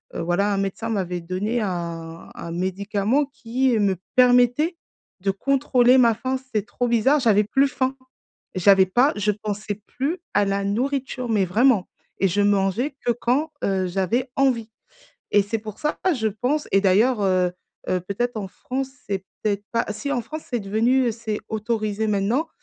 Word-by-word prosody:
heu, -, -, -2 dB
voilà, 195 Hz, +5 st, +1 dB
un -, -, 0 dB
médecin 195 Hz, +3 st, -2 dB
m'avait 180 Hz, -5 st, -2 dB
donné 190 Hz, +7 st, -2 dB
un 170 Hz, -3 st, -5 dB
un 170 Hz, -, -7 dB
médicament 200 Hz, +9 st, 0 dB
qui 255 Hz, -2 st, 0 dB
me 200 Hz, -2 st, +2 dB, 0.2 s
permettait 250 Hz, +6 st, +4 dB, 0.4 s
de 195 Hz, -, 0 dB
contrôler 255 Hz, +2 st, +3 dB
ma 235 Hz, -2 st, +5 dB
faim, 260 Hz, +3 st, -2 dB
c'était 255 Hz, -6 st, -3 dB
trop 245 Hz, +1 st, -2 dB
bizarre, 240 Hz, +6 st, +3 dB
j'avais 210 Hz, -4 st, +4 dB
plus 270 Hz, +6 st, +3 dB
faim! 260 Hz, 0 st, -1 dB, 0.6 s
J'avais 190 Hz, +1 st, +5 dB
pas 250 Hz, +9 st, +3 dB
je 210 Hz, 0 st, +1 dB
pensais 210 Hz, 0 st, -5 dB
plus 295 Hz, +8 st, -2 dB, 0.2 s
à 205 Hz, -, +4 dB
la 195 Hz, 0 st, -1 dB
nourriture 255 Hz, +3 st, -2 dB
mais 205 Hz, -4 st, +2 dB
vraiment 215 Hz, +1 st, +3 dB, 0.3 s
et 195 Hz, -, +3 dB
je 205 Hz, +4 st, +1 dB
mangeais 205 Hz, +7 st, +1 dB
que 240 Hz, -, +3 dB
quand, 260 Hz, +7 st, 0 dB
heu, 190 Hz, -2 st, 0 dB
j'avais 220 Hz, +8 st, -1 dB
envie 240 Hz, -5 st, +1 dB, 0.6 s
et 205 Hz, -, +5 dB
c'est 215 Hz, +3 st, -3 dB
pour 215 Hz, -1 st, -9 dB
ça, 300 Hz, 0 st, -1 dB, 0.2 s
je 220 Hz, -5 st, 0 dB
pense 250 Hz, +9 st, -1 dB
et 195 Hz, -, +5 dB
d'ailleurs, 210 Hz, +5 st, +3 dB
heu 185 Hz, -2 st, +2 dB, 0.4 s
heu, 185 Hz, -, +1 dB
peut-être 220 Hz, +6 st, -3 dB
en 195 Hz, -3 st, -5 dB
France, 265 Hz, +6 st, -4 dB, 0.2 s
c'est 195 Hz, -1 st, -2 dB, 0.2 s
peut-être 205 Hz, -1 st, -1 dB
pas 230 Hz, -, +1 dB
si, 280 Hz, +6 st, -5 dB
en 245 Hz, -, -1 dB
France, 310 Hz, +5 st, -7 dB
c'est 240 Hz, -3 st, -1 dB
devenu 230 Hz, +5 st, +2 dB
c'est 220 Hz, -2 st, -4 dB
autorisé 220 Hz, -1 st, -2 dB
maintenant, 215 Hz, +10 st, 0 dB
220 Hz, 170 wpm, -23 LUFS, 195-250 Hz, 0.6 s, ma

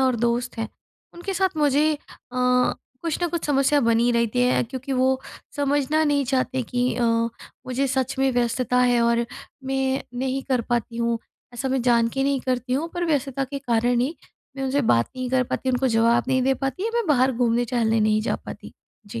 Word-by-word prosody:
और 260 Hz, -2 st, +2 dB
दोस्त 240 Hz, +1 st, -1 dB
हैं 225 Hz, -1 st, -2 dB, 0.5 s
उनके 375 Hz, +3 st, -5 dB
साथ 380 Hz, -4 st, 0 dB
मुझे 300 Hz, +1 st, +3 dB
अ, 290 Hz, -, -9 dB, 1.0 s
कुछ 330 Hz, -1 st, -2 dB
ना -, -, +3 dB
कुछ 340 Hz, -1 st, -3 dB
समस्या 285 Hz, 0 st, +3 dB
बनी 230 Hz, +1 st, +3 dB
ही 245 Hz, -, +3 dB
रहती 235 Hz, +1 st, +1 dB
है 250 Hz, -, +3 dB
क्योंकि 265 Hz, +2 st, -6 dB
वो 260 Hz, 0 st, +2 dB, 0.4 s
समझना 290 Hz, +2 st, +1 dB
नहीं 285 Hz, -2 st, +2 dB
चाहते 260 Hz, 0 st, 0 dB
कि 245 Hz, +2 st, -1 dB
अ, 245 Hz, -, 0 dB, 0.6 s
मुझे 260 Hz, +2 st, 0 dB
सच 265 Hz, 0 st, -1 dB
में 270 Hz, 0 st, +3 dB
व्यस्तता 245 Hz, +1 st, +1 dB
है 245 Hz, -1 st, +3 dB
और 235 Hz, 0 st, +2 dB, 0.4 s
मैं 265 Hz, 0 st, 0 dB, 0.2 s
नहीं 265 Hz, +1 st, -1 dB
कर 255 Hz, -2 st, +2 dB
पाती 235 Hz, -1 st, -1 dB
हूँ। 235 Hz, -1 st, 0 dB, 0.4 s
ऐसा 265 Hz, +2 st, -2 dB
मैं 265 Hz, -1 st, 0 dB
जानके 235 Hz, +2 st, +2 dB
नहीं 275 Hz, -2 st, +1 dB
करती 250 Hz, -1 st, -2 dB
हूँ 300 Hz, +6 st, 0 dB
पर 350 Hz, 0 st, -1 dB
व्यस्तता 275 Hz, -3 st, 0 dB
के 275 Hz, +1 st, -5 dB
कारण 240 Hz, -2 st, +1 dB
ही 275 Hz, +7 st, -1 dB, 0.4 s
मैं 270 Hz, -, -3 dB
उनसे 275 Hz, +2 st, +1 dB
बात 115 Hz, -, +3 dB
नहीं 255 Hz, -1 st, -3 dB
कर 260 Hz, -1 st, +3 dB
पाती, 260 Hz, +1 st, -2 dB
उनको 255 Hz, +1 st, +1 dB
जवाब 230 Hz, 0 st, +3 dB
नहीं 260 Hz, -1 st, +2 dB
दे 265 Hz, +1 st, +2 dB
पाती 270 Hz, +6 st, -3 dB
या 455 Hz, -, 0 dB
मैं 470 Hz, -4 st, 0 dB
बाहर 265 Hz, -3 st, +3 dB
घूमने-टहलने 235 Hz, -1 st, +1 dB
नहीं 215 Hz, 0 st, +3 dB
जा -, -, -1 dB
पाती। -, -, -10 dB, 0.3 s
जी। 160 Hz, -, -6 dB
255 Hz, 195 wpm, -23 LUFS, 240-275 Hz, 1.0 s, मुझे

